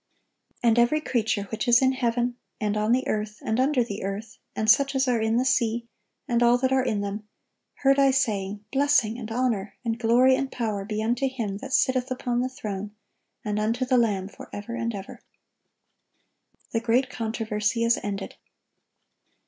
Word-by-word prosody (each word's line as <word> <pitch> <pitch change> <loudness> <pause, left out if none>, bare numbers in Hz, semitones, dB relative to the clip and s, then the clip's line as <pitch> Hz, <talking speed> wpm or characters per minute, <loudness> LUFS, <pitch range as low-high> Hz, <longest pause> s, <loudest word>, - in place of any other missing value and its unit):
"And 235 0 +4
every 240 +6 +3
creature 225 -8 0
which 220 +1 -3
is 240 0 +6
in 260 -1 +3
heaven, 245 -1 0 0.2
and 210 -1 -1
on 215 +1 +1
the 255 +2 +2
earth, 215 0 -2
and 220 +2 0
under 265 -1 +3
the 205 -4 -6
earth, 200 +2 -5 0.2
and 215 - -1
such 275 +5 +4
as 265 0 +2
are 240 -3 +2
in 220 +1 +1
the 255 - +1
sea, 235 -3 +1 0.4
and 240 -1 +1
all 240 0 +5
that 260 +1 0
are 265 -1 +3
in 210 -5 -1
them, 205 +1 -5 0.6
heard 275 0 +5
I 275 0 +5
saying, 210 -6 -1
Blessing, 270 -5 +2
and 225 -2 -7
honor, 225 -5 -1
and 230 0 -1
glory, 245 +3 +5
and 275 0 -2
power, 215 -5 -2
be 215 +1 -3
unto 240 +4 +1
Him 225 -7 -4
that 270 +6 -8
sitteth 260 -1 +2
upon 245 -1 -1
the 255 - -1
throne, 210 -6 -6 0.5
and 210 0 -1
unto 230 +4 0
the 255 0 +2
Lamb 200 -5 0
forever 205 +2 -9
and 235 -1 -2
ever."(1194) 195 0 -9 1.5
The 230 - +1
great 240 +4 +1
controversy 220 0 -1
is 230 0 +3
ended. 200 -1 -5
230 Hz, 180 wpm, -25 LUFS, 215-255 Hz, 1.5 s, is